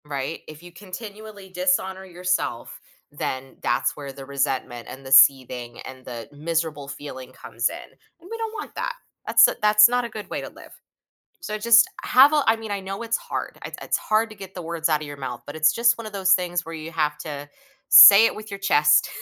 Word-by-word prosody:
Right? 140 Hz, +1 st, -5 dB
If 155 Hz, +2 st, -12 dB
you 175 Hz, -, -13 dB
continually 205 Hz, +2 st, -11 dB
dishonor 185 Hz, +1 st, -1 dB
yourself, 180 Hz, -9 st, -4 dB, 0.3 s
then 130 Hz, 0 st, -6 dB
that's -, -, -1 dB
where 140 Hz, -2 st, -8 dB
the 135 Hz, 0 st, -11 dB
resentment, 130 Hz, -3 st, -3 dB
and 135 Hz, +1 st, -11 dB
the 130 Hz, -, -9 dB
seething, 130 Hz, -3 st, +4 dB
and 130 Hz, 0 st, -11 dB
the 120 Hz, -2 st, -8 dB
miserable 155 Hz, -1 st, -3 dB
feeling 130 Hz, -3 st, -9 dB
comes 120 Hz, -1 st, -3 dB
in; -, -, -9 dB, 0.4 s
and 350 Hz, +2 st, -16 dB
we 455 Hz, -, -5 dB
don't 450 Hz, -1 st, -5 dB
want 420 Hz, -, -8 dB
that, -, -, -3 dB, 0.3 s
that's -, -, +6 dB
u -, -, -2 dB
that's 210 Hz, 0 st, +6 dB
not 245 Hz, +1 st, -1 dB
a -, -, -6 dB
good 215 Hz, -1 st, -9 dB
way -, -, -3 dB
to -, -, -8 dB
live. -, -, -16 dB, 0.7 s
So, 215 Hz, 0 st, -5 dB
just 230 Hz, +1 st, +5 dB
have 270 Hz, +4 st, +5 dB
a 300 Hz, -2 st, +2 dB
I 225 Hz, -, +4 dB
mean, 225 Hz, -1 st, -9 dB
I 200 Hz, -, -2 dB
know 195 Hz, +3 st, -7 dB
it's 230 Hz, 0 st, -1 dB
hard, -, -, -6 dB
it -, -, -8 dB
it's -, -, -1 dB
hard 220 Hz, +1 st, 0 dB
to 215 Hz, -, -12 dB
get 195 Hz, -1 st, -11 dB
the 180 Hz, -, -7 dB
words 165 Hz, 0 st, -2 dB
out 155 Hz, -2 st, +1 dB
of 155 Hz, -, -7 dB
your 145 Hz, -, -8 dB
mouth, 130 Hz, -3 st, -7 dB
but 145 Hz, -, -9 dB
it's 155 Hz, 0 st, +3 dB
just 235 Hz, +1 st, +2 dB
one 230 Hz, -, -8 dB
of 215 Hz, -, -9 dB
those 190 Hz, -2 st, +3 dB
things 175 Hz, -1 st, -2 dB
where 165 Hz, -, -9 dB
you 160 Hz, +1 st, -8 dB
have 150 Hz, -2 st, -1 dB
to 145 Hz, -2 st, -8 dB, 0.4 s
say 205 Hz, -2 st, +10 dB
it -, -, -2 dB
with 215 Hz, 0 st, -10 dB
your 200 Hz, 0 st, -7 dB
chest. 150 Hz, -6 st, +3 dB
175 Hz, 220 wpm, -23 LUFS, 140-215 Hz, 0.7 s, say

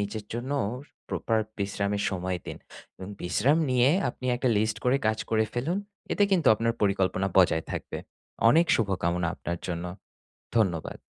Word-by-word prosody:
নিজের 105 Hz, +1 st, -3 dB
জন্য 120 Hz, +3 st, -4 dB, 0.6 s
proper 115 Hz, -1 st, 0 dB, 0.2 s
বিশ্রামের 100 Hz, 0 st, -1 dB
সময় 90 Hz, -1 st, -2 dB
দিন -, -, -5 dB, 0.4 s
এবং 95 Hz, -, -8 dB
বিশ্রাম 125 Hz, -, +2 dB
নিয়ে 125 Hz, 0 st, +4 dB, 0.2 s
আপনি 130 Hz, -, -8 dB
একটা 125 Hz, +1 st, 0 dB
list 110 Hz, +1 st, +1 dB
করে 125 Hz, +2 st, +4 dB
কাজ 110 Hz, 0 st, +1 dB
করে 110 Hz, -1 st, +3 dB
ফেলুন। 150 Hz, +10 st, 0 dB, 0.3 s
এতে 205 Hz, -, +2 dB
কিন্তু 175 Hz, -5 st, +4 dB
আপনার 115 Hz, +2 st, 0 dB
পরিকল্পনা 95 Hz, -1 st, +1 dB
বজায় 85 Hz, -3 st, +4 dB
থাকবে। -, -, -5 dB, 0.5 s
অনেক 165 Hz, +7 st, +5 dB
শুভকামনা 90 Hz, -5 st, 0 dB
আপনার 85 Hz, 0 st, -4 dB
জন্য। 85 Hz, -1 st, -3 dB, 0.7 s
ধন্যবাদ। 90 Hz, -8 st, 0 dB
105 Hz, 145 wpm, -27 LUFS, 95-120 Hz, 0.7 s, অনেক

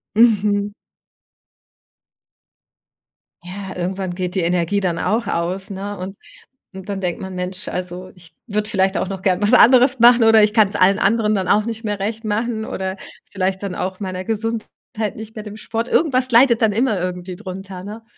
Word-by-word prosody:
Mhm. 205 Hz, -2 st, +3 dB, 2.7 s
Ja, 190 Hz, +2 st, -8 dB
irgendwann 185 Hz, +1 st, -3 dB
geht 180 Hz, +1 st, -3 dB
die 190 Hz, -, +1 dB
Energie 175 Hz, +3 st, +1 dB
dann 180 Hz, -4 st, -1 dB
auch 220 Hz, +5 st, 0 dB
aus, 185 Hz, +4 st, -2 dB
ne? 200 Hz, +1 st, -5 dB
Und 190 Hz, +2 st, -7 dB, 0.7 s
dann 195 Hz, -1 st, -3 dB
denkt 180 Hz, -2 st, -3 dB
man: 190 Hz, -1 st, -6 dB
„Mensch, 180 Hz, +1 st, -4 dB
also, 180 Hz, 0 st, -5 dB
ich 175 Hz, -2 st, -18 dB
würde 210 Hz, 0 st, -2 dB
vielleicht 190 Hz, -2 st, +1 dB
auch -, -, -1 dB
noch 190 Hz, -1 st, -5 dB
gern 185 Hz, -1 st, +1 dB
was 210 Hz, +3 st, +2 dB
anderes 250 Hz, +1 st, +6 dB
machen 240 Hz, 0 st, +7 dB
oder 225 Hz, -1 st, +6 dB
ich 210 Hz, 0 st, +2 dB
kann's 210 Hz, -2 st, +3 dB
allen 195 Hz, +1 st, +4 dB
anderen 215 Hz, 0 st, +2 dB
dann 190 Hz, -1 st, -1 dB
auch 210 Hz, 0 st, +3 dB
nicht 225 Hz, 0 st, -5 dB
mehr 205 Hz, -2 st, -3 dB
recht 220 Hz, +3 st, -3 dB
machen 220 Hz, +1 st, -2 dB
oder 190 Hz, -2 st, -4 dB, 0.3 s
vielleicht 190 Hz, 0 st, -2 dB
dann 195 Hz, -2 st, -4 dB
auch 185 Hz, +1 st, -4 dB
meiner 185 Hz, -2 st, -4 dB
Gesundheit, 225 Hz, +1 st, -2 dB, 0.5 s
nicht 220 Hz, +1 st, -9 dB
mehr 215 Hz, -, -6 dB
dem 210 Hz, 0 st, -9 dB
Sport.“ 225 Hz, +2 st, -3 dB
Irgendwas 260 Hz, -5 st, +2 dB
leidet 235 Hz, -1 st, +5 dB
dann 220 Hz, -2 st, +4 dB
immer 220 Hz, -2 st, +1 dB
irgendwie 180 Hz, 0 st, -4 dB
drunter, 190 Hz, -1 st, -8 dB
ne? 215 Hz, +3 st, -8 dB
200 Hz, 175 wpm, -20 LUFS, 185-220 Hz, 2.7 s, machen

